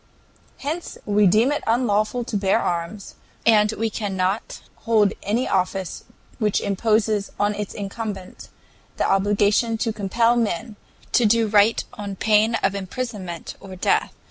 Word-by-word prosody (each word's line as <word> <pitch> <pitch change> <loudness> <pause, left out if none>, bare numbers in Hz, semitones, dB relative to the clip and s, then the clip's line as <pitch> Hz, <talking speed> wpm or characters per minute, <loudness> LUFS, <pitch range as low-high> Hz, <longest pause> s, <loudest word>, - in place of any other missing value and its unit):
"Hence 315 +5 -4
we 205 -1 +4
deem 220 +9 +4
it 290 - -2
unlawful 225 0 +1
to 230 - -5
bear 195 -1 +2
arms, 175 +4 -3 0.3
and 215 -2 +5
we 225 0 -2
cannot 195 0 -2
hold 215 -3 +2
any 225 +6 0
office 185 -1 -1 0.3
which 210 -3 +1
imposes 215 0 +1
on 205 +1 +2
its 210 -1 -5
incumbent 200 -2 -6 0.5
the - - +1
obligation 205 +3 +2
to 225 0 -1
compel 230 +3 +2
men 220 -2 -1 0.4
to 235 - +4
do 230 +1 +3
right 210 +1 +3
on 205 -4 -6
pain 220 +3 +3
of 195 - +2
imprisonment 195 -3 -5
or 190 -1 -10
death. 180 - +1
210 Hz, 140 wpm, -23 LUFS, 195-225 Hz, 0.5 s, and